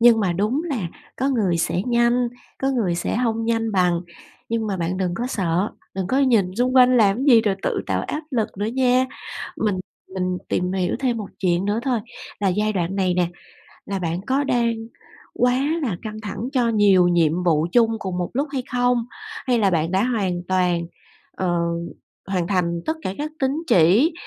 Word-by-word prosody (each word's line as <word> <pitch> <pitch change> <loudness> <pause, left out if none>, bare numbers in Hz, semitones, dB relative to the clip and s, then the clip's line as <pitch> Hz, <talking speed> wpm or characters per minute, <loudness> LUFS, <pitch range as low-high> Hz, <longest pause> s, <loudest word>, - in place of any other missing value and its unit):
nhưng 230 -1 +6
mà 190 -4 +1
đúng 215 - 0
là 250 - -2 0.3
có 265 - 0
người 205 -10 +1
sẽ 175 +2 0
nhanh, 240 0 +2 0.3
có 270 - +2
người 220 -10 0
sẽ 175 - -2
hông 225 -2 0
nhanh 225 -1 0
bằng, 180 -3 +2 0.5
nhưng 225 -1 -1
mà 200 -2 -1
bạn 175 +1 -2
đừng 185 -2 -1
có 235 +7 -2
sợ, 185 -4 0 0.2
đừng 190 -1 -2
có 260 - +1
nhìn 225 -9 +3
xung 250 +1 +1
quanh 255 0 +7
làm 205 -4 +4
cái 260 - -2
gì 240 -5 +7
rồi 210 -3 +1
tự - - -1
tạo - - 0
áp 300 - -3
lực 230 -6 0
nữa 205 - -1
nha. 255 +2 +2 0.5
Mình 205 -4 0 0.3
mình 185 -1 -1
tìm 180 0 0
hiểu 185 -2 0
thêm 250 -3 +1
một 210 -3 -5
chuyện 180 -1 +1
nữa 205 +2 0
thôi, 250 -3 0 0.4
là 200 - +2
giai 210 +3 +1
đoạn 185 -1 -2
này 185 -2 +1
nè, 180 -1 +2 0.6
là 195 -1 -3
bạn 170 0 -2
có 270 +2 +2
đang 235 -4 +1 0.6
quá 250 +1 +2 0.2
là 220 -11 -1
căng 215 -1 -6
thẳng 210 +3 -4
cho 245 -3 +2
nhiều 200 -5 +5
nhiệm 170 0 +2
vụ 160 -2 +2
chung 225 0 +4
cùng 185 -3 -4
một 175 -1 -2
lúc 280 +5 0
hay 265 -3 -2
không? 245 -1 +2 0.4
Hay 245 -2 +3
là 200 -3 +3
bạn 165 -2 0
đã 190 +2 +2
hoàn 200 -8 0
toàn, 180 -2 +1 0.5
ờ, 175 -2 0 0.7
hoàn 185 -3 -1
thành 170 -3 0
tất 315 - +1
cả 190 - -3
các 305 +1 -3
tín 265 -1 +2 0.2
chỉ, 195 - +5
210 Hz, 200 wpm, -22 LUFS, 180-245 Hz, 0.7 s, quanh